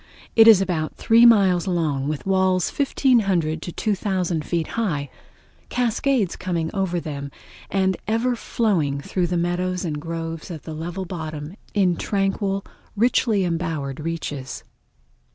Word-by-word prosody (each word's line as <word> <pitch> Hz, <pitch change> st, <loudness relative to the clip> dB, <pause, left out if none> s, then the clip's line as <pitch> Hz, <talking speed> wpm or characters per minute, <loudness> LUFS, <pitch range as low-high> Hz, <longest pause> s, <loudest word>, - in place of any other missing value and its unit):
It 225 Hz, -1 st, +8 dB
is 215 Hz, -4 st, +8 dB
about 165 Hz, -5 st, -2 dB
three 230 Hz, +1 st, +6 dB
miles 195 Hz, -6 st, +4 dB
long, 155 Hz, -7 st, 0 dB
with 150 Hz, -1 st, -3 dB
walls 190 Hz, -2 st, +2 dB
1500 195 Hz, -, +2 dB
to 175 Hz, -, -5 dB
2000 185 Hz, -5 st, -1 dB
feet 165 Hz, -1 st, -2 dB
high, 150 Hz, -, -2 dB, 0.6 s
cascades 245 Hz, -3 st, +1 dB
coming 170 Hz, -3 st, -2 dB
over 190 Hz, -3 st, 0 dB
them, 140 Hz, -3 st, -5 dB, 0.4 s
and 190 Hz, -1 st, +2 dB
the -, -, -9 dB
ever 230 Hz, +3 st, +1 dB
flowing 175 Hz, -13 st, 0 dB
through 175 Hz, +5 st, -1 dB
the 175 Hz, 0 st, -1 dB
meadows 180 Hz, +1 st, -1 dB
and 150 Hz, -3 st, -3 dB
groves 165 Hz, 0 st, -5 dB
of 165 Hz, -4 st, -7 dB
the 160 Hz, -, -7 dB
level 175 Hz, +4 st, -5 dB
bottom 155 Hz, -3 st, -6 dB, 0.2 s
in 185 Hz, -4 st, +3 dB
tranquil, 195 Hz, 0 st, -1 dB, 0.3 s
richly 220 Hz, -2 st, +2 dB
embowered 165 Hz, -6 st, -2 dB
reaches. 150 Hz, -4 st, -5 dB
180 Hz, 135 wpm, -23 LUFS, 160-200 Hz, 0.6 s, It